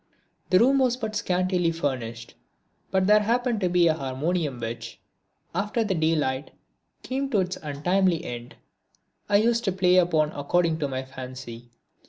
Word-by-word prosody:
The 185 - +5
room 270 +6 +4
was 250 -2 +2
but 220 -3 -4
scantily 180 -4 +1
furnished, 125 -8 -4 0.6
but 190 -1 +1
there 210 +2 +6
happened 235 +2 0
to 180 - +1
be 175 -1 +4
a 160 - +4
harmonium 145 0 -2
which, 115 0 -6 0.5
after 205 +6 0
the 205 -3 -1
daylight 155 -5 0 0.5
came 270 +1 -2
to 210 -7 +2
its 180 0 -3
untimely 170 +4 0
end, 120 0 -7 0.7
I 200 - +5
used 230 +2 +2
to 195 - +2
play 180 -1 +3
upon 160 -4 +3
according 160 +3 0
to 145 - 0
my 130 -1 -3
fancy. 125 -2 -9
175 Hz, 155 wpm, -25 LUFS, 135-200 Hz, 0.7 s, there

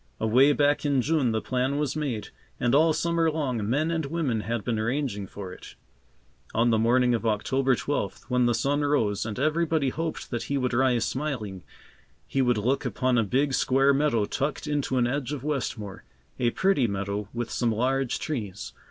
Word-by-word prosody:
Away 125 +6 +5
back 145 0 +2
in 140 -2 +2
June 150 -5 +1
the 110 0 -1
plan 130 +2 0
was 150 -2 -1
made, 135 -9 -3 0.3
and 120 0 +1
all 160 +3 +5
summer 165 +1 +1
long, 130 -9 -2
men 155 +6 +1
and 160 -3 -1
women 140 -7 -1
had 115 0 -3
been 115 -3 -1
arranging 115 -4 -2
for 95 -2 -8
it. - - -12 0.8
On 115 +1 +3
the 110 - +3
morning 125 +2 +3
of 115 - -1
October 130 +4 +1
twelfth, 130 -7 -3
when 125 -1 +2
the 120 - +2
sun 140 +5 0
rose, 115 -8 +1
and 105 - -5
everybody 155 0 +1
hoped 160 +4 -4
that 120 -2 -3
he 140 - -1
would 125 -1 -1
rise 125 -1 +2
smiling, 125 -10 -3 0.6
he 135 - 0
would 125 -3 +2
look 130 +7 0
upon 125 -1 +1
a - - +3
big 135 +7 +1
square 135 +2 +3
meadow 135 -7 +2
tucked 140 +6 -2
into 145 -3 -1
an 125 - +3
edge 135 +2 -2
of 140 -3 -5
Westmore, 120 -9 -3 0.4
a 120 -2 +3
pretty 165 -3 +2
meadow 100 0 -3
with 120 0 -4
some 120 -2 0
large 130 +3 0
trees. 105 -10 -5
130 Hz, 185 wpm, -26 LUFS, 115-145 Hz, 0.8 s, Away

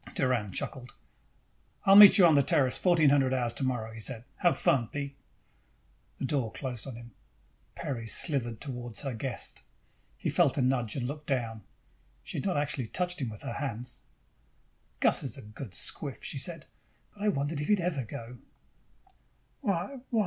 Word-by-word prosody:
Doran 125 -7 +1
chuckled. 125 +5 -5 0.9
"I'll 195 - +7
meet 205 -1 +11
you 190 - +8
on 165 - +6
the 140 - +6
Terrace 130 -1 +2
at - - -3
fourteen 165 -6 +5
hundred 135 -2 +3
hours 120 -2 -1
tomorrow," 125 -5 -2
he 115 - -9
said. 115 +1 -4
"Have 175 -3 +2
fun, 120 -4 +2
Pete." 140 +2 -5 1.0
The - - -3
door 130 -5 -1
closed 130 -3 -6
on 130 - -6
him. 120 0 -11 0.6
Peri 115 -4 -4
slithered 120 -4 0
toward 120 -4 -6
her 135 -3 -3
guest. 120 +2 -4 0.6
He - - -4
felt - - +3
a 135 - +2
nudge 125 -4 0
and 125 - -2
looked 150 +3 -6
down. 115 -5 -2 0.6
She - - -5
had - - -5
not 185 -6 0
actually 145 -4 -1
touched 180 +4 -1
him 125 - -1
with 105 -2 -8
her - - -4
hands. 125 -3 -4 1.0
"Gus - - +3
is - - -5
a - - -10
good 105 0 -9
squiff," 140 - +1
she 140 - -3
said, 165 +3 -2 0.5
"but 205 - -16
I 210 - 0
wondered 145 -4 0
if 150 - -3
he'd 210 -2 +3
ever 170 -6 -1
go." 115 +2 -9 1.2
"Why, 200 +2 -1
why 230 - +1
135 Hz, 180 wpm, -29 LUFS, 120-150 Hz, 1.2 s, meet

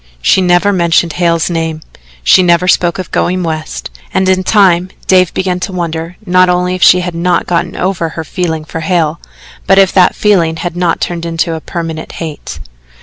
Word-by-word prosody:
She 125 - +2
never 180 +3 +2
mentioned 170 -2 +1
Hale's 170 -2 +1
name, 165 -2 -3 0.4
she 70 - +5
never 175 0 +2
spoke 175 -1 +2
of 185 - -6
going 180 +1 0
West, 155 -2 -5 0.2
and 190 0 0
in 185 0 +2
time 185 -3 +3 0.2
Dave 185 -2 +3
began 185 -1 -1
to 190 - -4
wonder 170 -1 -4
not 185 -1 +3
only 180 0 0
if 185 - -5
she 180 - +6
had 180 -1 -4
not 175 +1 0
gotten 175 0 -2
over 180 -3 -2
her 160 +1 -6
feeling 160 -1 -3
for 165 - -6
Hale, 160 -1 0 0.5
but 195 - +4
if 195 -1 +5
that 185 -2 +4
feeling 175 -6 +2
had 175 +1 -5
not 175 -2 0
turned 170 -1 -3
into 165 -1 -2
permanent 160 -1 -6
hate. 160 -3 -7
175 Hz, 185 wpm, -12 LUFS, 165-185 Hz, 0.5 s, she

